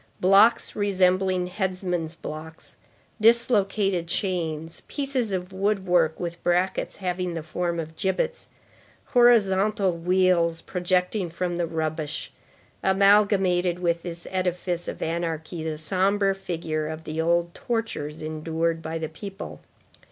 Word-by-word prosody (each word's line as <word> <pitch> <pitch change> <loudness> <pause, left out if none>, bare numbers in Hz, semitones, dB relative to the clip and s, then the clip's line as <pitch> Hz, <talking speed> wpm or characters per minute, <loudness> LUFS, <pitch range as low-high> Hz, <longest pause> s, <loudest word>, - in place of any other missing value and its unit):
Blocks 200 +5 +5
resembling 185 -2 +2
headsman's 180 -3 -2
blocks, 160 0 -8 0.5
dislocated 205 -6 +3
chains, 165 -3 -2
pieces 270 -6 -1
of 185 0 -3
woodwork 190 -5 +1
with 170 -1 -5
brackets 180 +2 0
having 180 -2 -3
the 165 - -4
form 170 +1 -2
of 160 0 -6
gibbets, 480 - -1 0.6
horizontal 210 -5 +4
wheels 175 -1 +2
projecting 180 +1 0
from 175 +1 -3
the 170 -1 0
rubbish, 155 -2 -3 0.5
amalgamated 190 -2 +3
with 170 -1 0
this 170 -1 -6
edifice 180 -1 -1
of - - -4
anarchy 165 0 -3
the 160 -1 -3
sombre 195 +4 +2
figure 160 -5 -3
of 160 +1 -6
the 155 +1 -3
old 170 +1 +1
tortures 220 -11 -3
endured 160 +1 -2
by 160 0 -4
the 160 -1 -3
people. 195 +4 -8
180 Hz, 115 wpm, -25 LUFS, 165-195 Hz, 0.6 s, Blocks